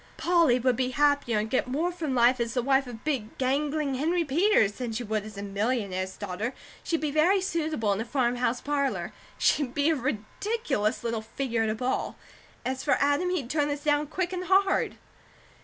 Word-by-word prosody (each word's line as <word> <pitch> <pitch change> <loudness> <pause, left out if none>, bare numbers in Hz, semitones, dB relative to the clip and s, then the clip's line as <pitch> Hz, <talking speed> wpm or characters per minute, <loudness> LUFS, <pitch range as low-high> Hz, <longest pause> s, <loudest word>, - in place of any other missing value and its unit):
Polly 335 -8 +3
would 255 0 +2
be 255 +1 0
happier 285 -4 +2
and 210 +1 0
get 255 +3 0
more 310 +8 0
from 315 -6 -3
life 245 +1 +4
as 235 +1 -2
the 250 - +1
wife 270 0 +2
of 230 -2 -9
big 260 -8 -2
gangling 285 +2 0
Henry 330 +6 +1
Peters, 310 - +3
than 240 +2 -5
she 225 +2 -3
would 215 -2 -2
as 215 -1 -10
a 200 - -5
millionaire's 200 -2 -2
daughter. 205 +5 -4 0.3
She'd 330 -2 -1
be 305 -2 -1
very 335 +7 +4
suitable 315 - -1
in 200 - -2
a - - -1
farmhouse 245 -1 0
parlour; 285 -2 -1 0.2
she'd 270 -4 +1
be 290 +3 +3
a - - +2
ridiculous 255 - -2
little 230 -1 -1
figure 235 +1 -2
at 220 - +1
a 215 - -1
ball. 250 +3 -2 0.5
As 260 0 -2
for - - +3
Adam, 285 +6 +2
he'd 345 -9 -1
turn 295 -1 +1
this 290 0 -3
down 295 -1 +2
quick 360 +4 -2
and 365 0 -3
hard." 385 +1 +2
265 Hz, 195 wpm, -27 LUFS, 230-305 Hz, 0.5 s, life